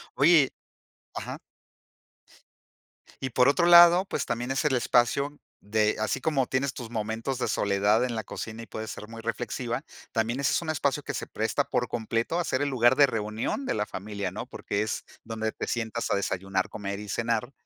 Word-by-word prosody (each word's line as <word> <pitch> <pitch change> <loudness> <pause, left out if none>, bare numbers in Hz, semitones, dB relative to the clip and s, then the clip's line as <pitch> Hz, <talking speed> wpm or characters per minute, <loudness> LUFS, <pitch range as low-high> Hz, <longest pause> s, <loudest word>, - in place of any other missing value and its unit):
Oye 145 -1 +6 0.7
ajá. - - -5 1.8
Y 130 -2 -3
por 125 +2 +4
otro 170 +4 +3
lado, 175 +2 +8
pues, - - -2
también 120 +2 -2
es 135 - 0
el 140 -3 +3
espacio 125 +4 +2 0.2
de 105 +1 +1
así 110 +4 -1
como 140 -5 +1
tienes 130 +1 -1
tus 120 -3 -7
momentos 115 +3 -3
de - - 0
soledad 100 +3 +2
en 125 - -3
la 110 - -2
cocina 115 0 -6
y 115 - -10
puedes 110 0 -6
ser 105 - -8
muy 115 0 -9
reflexiva, 120 +2 -3 0.3
también 115 +2 0
ese 140 - +2
es - - +1
un 165 - -5
espacio 145 -1 0
que - - -5
se - - -3
presta 110 0 -1
por 125 - -1
completo 115 +6 -1
a 175 - +1
ser 130 -2 -1
el 145 - +1
lugar 120 -1 +4
de 140 0 +6
reunión 110 - -2
de - - 0
la 105 0 -1
familia, 100 0 -4
¿no? - - -6
Porque 100 +1 -3
es 110 - -3 0.2
donde 110 -1 -3
te - - -5
sientas 115 -1 -2
a - - +3
desayunar, 95 -1 -1
comer 100 -1 -5
y 105 -1 -8
cenar, 115 +3 -1
115 Hz, 195 wpm, -27 LUFS, 110-135 Hz, 1.8 s, lado